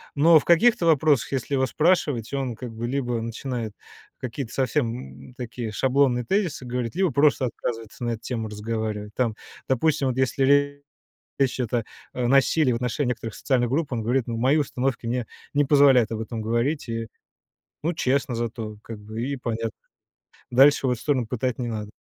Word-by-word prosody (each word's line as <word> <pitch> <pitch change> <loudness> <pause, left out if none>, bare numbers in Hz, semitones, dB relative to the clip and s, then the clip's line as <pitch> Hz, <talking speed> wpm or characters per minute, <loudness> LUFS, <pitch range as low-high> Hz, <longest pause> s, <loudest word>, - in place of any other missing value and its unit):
Но 160 +2 +7
в - - -9
каких-то 190 +2 +4
вопросах, 150 -5 +3
если 135 +2 -2
его 130 0 +2
спрашивать, 150 - +1
он 130 -4 -2
как 120 0 -7
бы 115 +2 -4
либо 125 -3 -1
начинает 115 -1 -4 0.5
какие-то 125 -1 -5
совсем, 130 -2 -2
м, - - -16
такие 120 -3 -5
шаблонные 130 +1 +2
тезисы 180 - -1
говорить, 125 +1 -3
либо 185 -4 +2
просто 140 0 +3
отказывается 115 0 -5
на 120 - 0
эту 115 -1 -4
тему 115 -3 -4
разговаривать. 105 -1 -4
Там, 115 -4 0 0.3
допустим, 135 +1 +2
вот 125 - -3
если 130 +1 +2 0.9
речь 135 -2 +2
идет 120 -2 -2
о 115 -2 +1 0.3
о 125 -1 -1
насилии 135 +1 +4
в - - 0
отношении 125 +2 -1
некоторых 115 -2 -4
социальных 125 -3 +1
групп, 145 -1 -1
он 115 -2 -1
говорит: 125 +2 +1
"Ну, 115 -1 -3
мои 130 +5 +3
установки 130 -4 -1
мне 120 -1 -1 0.3
не 145 0 +4
позволяют 135 -5 +5
об 110 - -3
этом 110 0 -5
говорить". 120 +6 -1
И, 115 0 -3 0.8
ну, 170 +2 0
честно 130 -3 0
зато, 115 -2 -4
как 115 -2 -8
бы, 110 +2 -6
и 140 +2 -2
понятно. 115 -2 -3 0.8
Дальше 135 +1 +5
в - - +2
эту 120 - -2
сторону 130 -6 0
пытать 125 +1 -2
не 120 - -2
надо. 105 -2 -5
125 Hz, 180 wpm, -24 LUFS, 115-140 Hz, 0.9 s, Но